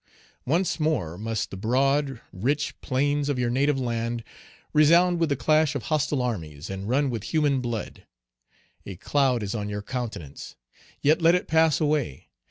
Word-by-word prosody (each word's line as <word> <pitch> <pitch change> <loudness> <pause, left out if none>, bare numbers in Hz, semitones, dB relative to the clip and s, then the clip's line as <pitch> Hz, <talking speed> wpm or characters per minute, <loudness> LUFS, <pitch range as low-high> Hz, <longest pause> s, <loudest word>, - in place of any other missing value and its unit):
Once 170 +5 +1
more 135 - 0
must 110 +2 -3
the - - -6
broad, 135 +5 +1
rich 140 +10 -1
plains 145 +2 0
of 140 - 0
your 120 -1 0
native 135 +2 +1
land 115 -1 -2 0.5
resound 170 +4 +5
with 165 -2 +1
the 140 - +1
clash 155 +1 +2
of 135 - -3
hostile 150 -3 +1
armies, 80 -11 -4
and 95 +2 -5
run 135 +2 +2
with 115 -4 -4
human 145 -4 +1
blood. 120 -3 -5 0.8
A 95 - -8
cloud 130 +3 +1
is 100 - -3
on 105 -2 -3
your 105 0 -4
countenance. 105 - -6 0.5
Yet 155 +4 +4
let 165 +2 +5
it 180 - -1
pass 160 -1 +3
away. 150 - -1
130 Hz, 165 wpm, -25 LUFS, 110-150 Hz, 0.8 s, resound